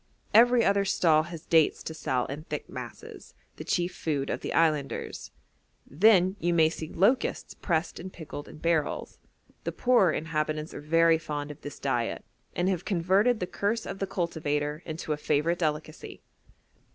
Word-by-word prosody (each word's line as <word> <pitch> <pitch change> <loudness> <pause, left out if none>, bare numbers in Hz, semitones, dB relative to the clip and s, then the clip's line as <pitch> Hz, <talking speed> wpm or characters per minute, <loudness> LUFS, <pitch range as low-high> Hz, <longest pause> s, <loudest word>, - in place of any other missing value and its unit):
Every 240 +1 +6
other 200 0 +3
stall 165 -5 +3
has 165 -3 -9
dates 160 -3 +3
to 160 - -5
sell 130 -5 -1
in 140 +3 -6
thick - - -5
masses, - - -9 0.2
the - - -6
chief 175 0 -1
food 145 -4 -2
of - - -2
the - - -4
islanders. 155 -4 0 0.6
Then 185 +3 +4
you 175 +1 +1
may 160 -1 +5
see 160 -1 -6
locusts 220 +9 +1
pressed 165 -2 -2
and 185 +2 -7
pickled 155 -4 -8
in - - -11
barrels; 160 -1 -1 0.4
the - - -2
poorer 240 -9 +3
inhabitants 155 -1 -2
are - - -7
very 165 +2 +4
fond 150 -2 -5
of 145 - -12
this 145 - -8
diet, 120 -4 -2 0.3
and 175 - 0
have 185 -2 0
converted 195 +6 +2
the 180 - -1
curse 210 +5 -2
of 195 - -6
the 195 - -2
cultivator 150 -4 -2
into 155 -1 -3
a - - -4
favourite 150 +3 0
delicacy. 155 -1 -4
165 Hz, 165 wpm, -28 LUFS, 150-185 Hz, 0.6 s, Every